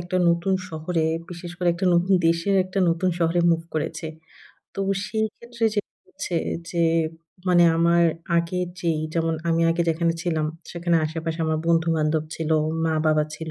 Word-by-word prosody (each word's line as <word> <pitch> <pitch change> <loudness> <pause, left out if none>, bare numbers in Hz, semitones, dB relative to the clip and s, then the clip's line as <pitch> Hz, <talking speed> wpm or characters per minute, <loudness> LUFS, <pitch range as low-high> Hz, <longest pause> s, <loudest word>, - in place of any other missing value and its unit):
একটা 175 +2 -3
নতুন 170 +3 +2
শহরে 160 +1 -2 0.3
বিশেষ 175 0 -7
করে, 180 -2 +1
একটা 185 +2 -1
নতুন 180 +3 +3
দেশের 170 +4 +2
একটা 185 +1 -4
নতুন 170 +2 +1
শহরে 170 +1 +2
মুভ 165 -1 +2
করেছি। 160 +1 -3 0.7
তো - - -3 0.3
সেইক্ষেত্রে 230 +2 -3
যে 205 - +2 0.3
হচ্ছে 175 - -4 0.3
যে 170 -1 0 0.7
মানে 175 -1 +6
আমার 170 +1 +4 0.3
আগে 170 +2 -2 0.2
যেই, 165 -3 0
যেমন 165 -1 +1
আমি 165 0 +2
আগে 170 +1 +1
যেখানে 165 +1 +1
ছিলাম 160 -3 0 0.3
সেখানে 170 0 +1
আশেপাশে 165 +1 -4
আমার 155 0 0
বন্ধু-বান্ধব 160 -2 +2
ছিল, 160 -1 -3 0.4
মা-বাবা 155 -1 +2
ছিল 160 -1 -6
170 Hz, 150 wpm, -24 LUFS, 160-175 Hz, 0.7 s, মানে